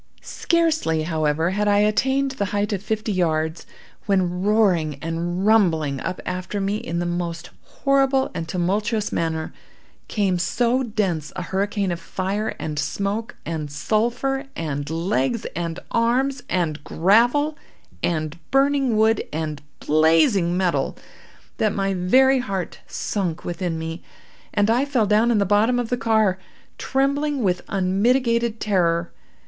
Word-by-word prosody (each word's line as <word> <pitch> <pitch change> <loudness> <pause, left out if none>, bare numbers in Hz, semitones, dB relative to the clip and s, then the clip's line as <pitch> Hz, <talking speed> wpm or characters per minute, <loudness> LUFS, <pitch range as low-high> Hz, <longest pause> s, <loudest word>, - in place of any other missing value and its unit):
"Scarcely, 320 - +1
however, 160 +1 0
had 210 +2 0
I 205 0 +4
attained 265 +7 +2
the 260 -6 -2
height 205 +1 -1
of 195 - -2
fifty 215 +1 -2
yards, 160 -3 -1 0.4
when, 180 -3 +1
roaring 190 -7 +2
and 170 +4 -3
rumbling 160 -10 +3
up 185 +1 -4
after 185 +3 -3
me 200 +1 0
in 190 -7 -4
the 175 - -1
most 175 -1 -3
horrible 270 -1 +1
and 165 -2 -4
tumultuous 205 +5 -1
manner, 160 -1 -2 0.5
came 195 -4 0
so 245 +7 +1
dense 195 - -2
a 180 - -3
hurricane 195 +1 -1
of 170 - -3
fire, 195 +4 -3
and 150 -2 -4
smoke, 200 +9 -2
and 160 -3 -4
sulphur, 235 - -1
and 145 -3 -3
legs 165 - -1
and 170 -1 -3
arms, 250 +4 +1
and 160 -5 -1
gravel, 240 - +3 0.5
and 155 -1 -2
burning 270 -3 +2
wood, 220 0 +3
and 155 -1 -3 0.2
blazing 165 +4 +3
metal, 180 -2 0 0.6
that 215 -2 +1
my 195 -1 0
very 260 +9 +4
heart 195 -7 -4
sunk 180 -6 -3
within 175 -1 -3
me, 165 +1 -5 0.5
and 205 +2 +2
I 245 +4 +3
fell 265 -6 +1
down 215 +3 +3
in 235 - +3
the 200 - +2
bottom 210 +5 +3
of 240 -2 -2
the 245 - +1
car, 220 -5 +2 0.4
trembling 280 0 0
with 180 -2 +1
unmitigated 230 +4 +1
terror. 170 -4 +1
195 Hz, 140 wpm, -22 LUFS, 170-230 Hz, 0.6 s, I